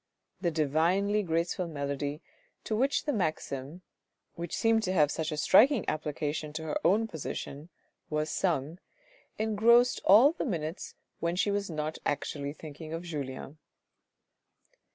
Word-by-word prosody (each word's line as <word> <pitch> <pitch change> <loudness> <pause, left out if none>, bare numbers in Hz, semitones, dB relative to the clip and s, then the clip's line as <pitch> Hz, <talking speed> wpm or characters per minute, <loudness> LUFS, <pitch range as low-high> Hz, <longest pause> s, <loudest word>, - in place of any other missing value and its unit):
The 175 - +1
divinely 170 +7 +2
graceful 170 0 -1
melody 145 0 -3 0.4
to 215 - -2
which 270 +5 +1
the 295 - 0
maxim, 155 - -3 0.5
which 170 -1 -5
seemed 225 0 +3
to 185 -3 -1
have 150 -5 +4
such 160 -1 -2
a 155 - -3
striking 225 - +5
application 150 0 -3
to 160 +1 -4
her 155 -1 -2
own 210 +6 +3
position, 155 -3 -6 0.4
was 150 0 -1
sung, 165 -2 -1 0.6
engrossed 225 +3 +4
all 230 +9 +7
the 335 - -4
minutes 165 - -4 0.2
when 170 +1 -1
she 200 +3 +1
was 200 -1 -1
not 155 -1 -3
actually 140 0 -2
thinking 155 +1 -9
of 165 +1 -4
Julien. 145 -2 -6
165 Hz, 135 wpm, -30 LUFS, 150-200 Hz, 0.6 s, all